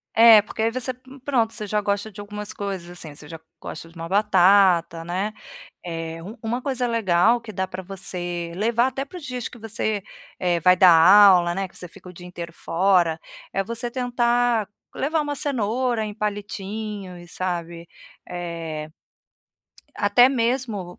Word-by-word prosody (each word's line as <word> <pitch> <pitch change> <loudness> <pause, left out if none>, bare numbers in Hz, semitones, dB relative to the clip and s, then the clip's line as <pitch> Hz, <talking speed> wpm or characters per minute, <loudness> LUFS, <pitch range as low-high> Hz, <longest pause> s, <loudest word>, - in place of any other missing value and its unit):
É 225 -1 +9
porque 220 - -6
aí 225 +1 +2
você, 255 +1 -3
p 250 - -27 0.2
pronto 235 -5 +1
você 215 - -5
já 210 +1 0
gosta 205 +1 -2
de 205 - -9
algumas 210 0 -7
coisas 195 -4 -5
assim, 165 -4 -8
você 150 - -12
já 165 +1 -9 0.2
gosta 165 +1 -8
de 165 - -21
uma 165 0 -6
batata 185 -4 +4
né. 190 +5 -3 0.5
Eh 165 -1 -5
u 210 +8 -9
uma 235 +3 -2
coisa 255 -2 -2
legal 225 0 +2
que 230 - -9
dá 190 -1 -2
para 185 0 -7
você 175 -2 -5
levar 235 +5 +2
até 265 +1 -3
para 325 +6 -10
os 345 - -10
dias 250 -3 -4
que - - -13
você, 220 -2 -2 0.4
eh, 175 -2 +1
vai 180 +3 +6
dar 180 -1 +8
aula, 180 0 +7
né, 195 0 -2
que - - -25
você 180 - -8
fica 180 - -14
o - - -12
dia 180 +1 -11
inteiro 170 -1 -8
fora, 170 -2 +1 0.3
é 195 - -1
você 235 +3 -4
tentar 240 -2 +1 0.3
levar 310 +3 0
uma 290 -1 -3
cenoura 245 -3 -1
em 210 - -6
palitinhos, 205 -3 -5
sabe, 170 -2 -4 0.4
eh, 165 -3 -5 1.1
até 205 +5 +5
mesmo, 230 -7 -2
200 Hz, 170 wpm, -23 LUFS, 175-230 Hz, 1.1 s, É